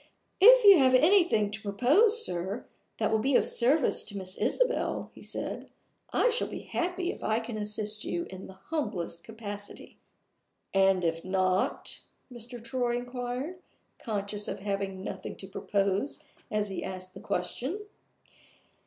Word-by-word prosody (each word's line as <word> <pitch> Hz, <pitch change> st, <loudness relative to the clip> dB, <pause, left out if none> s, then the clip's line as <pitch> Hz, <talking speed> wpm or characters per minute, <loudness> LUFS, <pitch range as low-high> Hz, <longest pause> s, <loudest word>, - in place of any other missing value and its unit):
"If -, -, +8 dB
you 395 Hz, -4 st, +10 dB
have 260 Hz, -1 st, +5 dB
anything 315 Hz, -, +4 dB
to 215 Hz, +1 st, -5 dB
propose, 295 Hz, -, +3 dB
sir, 185 Hz, +6 st, -3 dB, 0.3 s
that -, -, 0 dB
will 220 Hz, -, +3 dB
be 265 Hz, +4 st, +1 dB
of -, -, +4 dB
service 265 Hz, +4 st, +3 dB
to 205 Hz, -, -5 dB
Miss 185 Hz, -1 st, -4 dB
Isabel," 485 Hz, -, 0 dB
he -, -, -14 dB
said, -, -, -5 dB, 0.4 s
"I -, -, +3 dB
shall 470 Hz, -, +2 dB
be -, -, -6 dB
happy 360 Hz, +1 st, -2 dB
if -, -, -10 dB
I 220 Hz, +1 st, +1 dB
can 230 Hz, 0 st, -6 dB
assist 210 Hz, 0 st, -1 dB
you 170 Hz, -1 st, -2 dB
in 190 Hz, 0 st, -8 dB
the 190 Hz, -, -12 dB, 0.2 s
humblest 205 Hz, -, -3 dB
capacity." 205 Hz, -2 st, -8 dB, 0.7 s
"And 195 Hz, -2 st, +3 dB
if 165 Hz, 0 st, -1 dB
not?" 185 Hz, 0 st, 0 dB, 0.3 s
Mr. 240 Hz, +1 st, -9 dB
Troy 240 Hz, 0 st, -1 dB
inquired, 245 Hz, +7 st, -5 dB, 0.4 s
conscious 205 Hz, -2 st, -3 dB
of -, -, -5 dB
having 195 Hz, -1 st, -3 dB
nothing -, -, -6 dB
to 190 Hz, -, -9 dB
propose 200 Hz, +5 st, -1 dB, 0.3 s
as 210 Hz, -1 st, -1 dB
he 190 Hz, -, -4 dB
asked 185 Hz, 0 st, -7 dB
the -, -, -10 dB
question. 255 Hz, -, -2 dB
215 Hz, 150 wpm, -29 LUFS, 195-265 Hz, 0.7 s, you